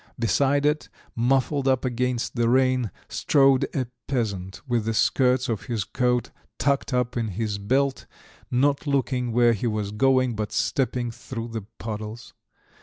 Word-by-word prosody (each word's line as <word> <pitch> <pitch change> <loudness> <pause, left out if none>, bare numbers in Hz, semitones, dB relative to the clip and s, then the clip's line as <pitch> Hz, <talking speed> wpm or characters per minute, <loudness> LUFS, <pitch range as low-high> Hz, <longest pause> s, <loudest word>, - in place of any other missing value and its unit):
Beside 140 +5 +2
it, 150 +1 +1 0.3
muffled 135 +3 +1
up 130 -1 +2
against 125 0 -1
the 120 -1 +2
rain, 130 -2 +3 0.2
strode 135 -2 +3
a 130 -3 0 0.2
peasant 100 -8 -2
with 120 -3 0
the 115 0 -1
skirts 130 +2 +2
of 115 -4 -3
his 115 -5 -2
coat 125 +2 0 0.3
tucked 140 0 0
up 125 -1 0
in 115 -2 -1
his 105 +1 -3
belt, 135 +6 0 0.4
not 140 +4 +1
looking 130 -3 0
where 120 0 +4
he 115 +2 -2
was 105 -2 -2
going, 130 +2 +2
but 105 0 -3
stepping 125 -3 0
through 115 0 -7
the 110 -3 -5
puddles. 110 +1 -6
125 Hz, 150 wpm, -25 LUFS, 115-130 Hz, 0.4 s, where